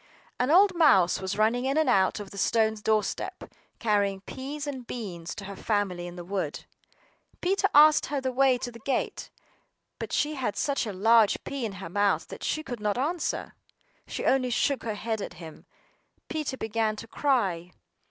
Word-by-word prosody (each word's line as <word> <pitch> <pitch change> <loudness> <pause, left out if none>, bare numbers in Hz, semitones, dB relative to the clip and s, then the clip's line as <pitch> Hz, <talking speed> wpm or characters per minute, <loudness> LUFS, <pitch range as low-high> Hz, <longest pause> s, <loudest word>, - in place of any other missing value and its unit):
An 250 +2 +1
old 375 +4 +6
mouse 265 - +4
was 190 +1 -3
running 230 +4 +2
in 270 +3 0
and 315 -2 +3
out 195 -5 +3
over 205 -2 -8
the 200 - -10
stone 220 0 +2
doorstep, 215 0 -1 0.3
carrying 200 -3 +1
peas 280 +7 -6
and 265 -4 -6
beans 175 -8 -6
to 200 - -7
her 200 0 -7
family 190 -5 -1
in 175 - -9
the 175 - -7
wood. 185 -5 -3 0.7
Peter 390 +2 +1
asked 305 +1 +7
her 285 -1 -1
the 260 -1 -2
way 260 0 +3
to 245 - -5
the 235 - -12
gate, 265 +4 -2 0.7
but - - -5
she 300 +1 +1
had 250 -8 -2
such 280 -4 0
a - - -3
large 220 +2 +4
pea 275 -4 -4
in 205 - -8
her 185 -3 -8
mouth 205 +2 +1
that - - -9
she 310 - -1
could 245 -6 -6
not 210 0 -1
answer. 315 +6 -2 0.5
She - - -4
only 260 -1 +2
shook 270 +3 +1
her 220 -2 -2
head 220 0 -3
at - - -6
him. 160 -2 -11 0.6
Peter 305 -4 -3
began 220 -1 -1
to 215 - -8
cry. 195 - 0
225 Hz, 185 wpm, -27 LUFS, 200-275 Hz, 0.7 s, asked